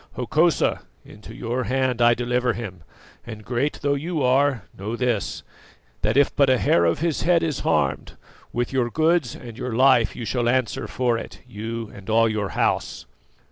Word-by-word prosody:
Hokosa, 155 +7 +1 0.2
into 105 0 -12
your 120 +2 -3
hand 130 -2 0
I 120 0 +5
deliver 125 0 0
him, 100 -5 -7 0.4
and, 110 -2 -9
great 130 +6 -2
though 145 0 +2
you 155 +1 -2
are, 130 -3 +2
know 105 +4 -4
this, 120 -4 -2 0.6
that 110 +4 +1
if 140 - +3
but 140 -2 +4
a 130 - +4
hair 85 -7 +3
of 85 - +1
his 165 -3 0
head 170 -1 +3
is 155 -4 -1
harmed, - - -1 0.3
with 120 +2 -2
your 125 -2 +1
goods 160 -3 +1
and 115 -3 -10
your 125 -3 -3
life 130 -2 +4
you 115 - -6
shall 120 0 0
answer 130 -3 0
for 120 -2 0
it, - - -10
you 115 0 -6
and 100 +1 -11
all 115 +1 +4
your 105 -3 -2
house." - - -1
120 Hz, 180 wpm, -23 LUFS, 115-135 Hz, 0.6 s, I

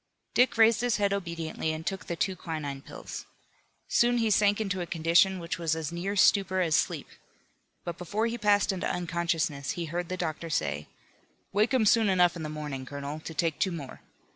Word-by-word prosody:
Dick 250 -1 +3
raised 225 0 +5
his 245 -2 +1
head 200 -1 +1
obediently 170 -4 -3
and 160 +1 -5
took 195 0 -3
the 170 - -2
two 190 +3 -1
quinine 155 -5 -5
pills. - - -8 0.6
Soon 240 0 +3
he 225 -2 +2
sank 205 0 +4
into 190 -4 -1
a 175 - -4
condition 170 +4 +3
which 170 -1 -4
was 165 -2 0
as 160 -1 -4
near 180 +4 -3
stupor 190 -1 +4
as 165 -4 +2
sleep. - - 0 0.8
But 170 -1 -5
before 205 +6 -1
he 235 +1 -2
passed 205 -1 +3
into 190 -2 -2
unconsciousness 170 -5 -1
he 170 - -4
heard 170 +2 -4
the 185 - -3
doctor 165 -1 -3
say: 75 - -1 0.7
"Wake 210 +5 +3
him 255 -5 +3
soon 220 0 +4
enough 180 -2 +4
in 170 - -6
the 155 - -4
morning, 150 -3 -5
Colonel, 140 +3 -6
to 160 - -8
take 165 -2 0
two 190 - +1
more. 150 -6 -7
175 Hz, 195 wpm, -28 LUFS, 160-200 Hz, 0.8 s, raised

